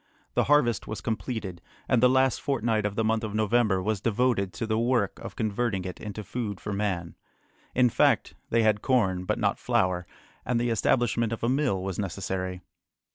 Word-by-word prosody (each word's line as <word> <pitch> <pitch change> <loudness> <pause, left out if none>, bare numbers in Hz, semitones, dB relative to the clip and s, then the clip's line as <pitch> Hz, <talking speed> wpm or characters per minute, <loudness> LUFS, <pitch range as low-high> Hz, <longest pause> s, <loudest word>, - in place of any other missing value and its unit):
The - - +2
harvest 135 -7 +3
was 110 - -4
completed, 110 -5 -4 0.3
and 125 - +3
the 125 - +6
last 130 -1 +2
fortnight 115 -6 0
of 100 - -6
the 115 - +1
month 110 +1 +1
of 105 -1 -4
November 110 -3 +2
was 105 -1 -1
devoted 115 -4 +1
to 115 - -3
the 110 0 0
work 120 -4 +1
of - - -8
converting 110 -3 -1
it 90 - -6
into 105 0 -6
food 100 0 -4
for 105 - -4
man. 95 -4 -2 0.6
In 125 0 +5
fact, 120 - +2 0.2
they 115 0 +3
had 105 -1 +2
corn, 95 -9 +1
but - - 0
not - - 0
flour, 90 -1 0 0.4
and 120 0 0
the 120 0 0
establishment 115 0 +1
of 115 - -4
a 115 - +2
mill 130 -9 +1
was 95 -2 -4
necessary. 95 -1 -3
110 Hz, 185 wpm, -27 LUFS, 95-120 Hz, 0.6 s, the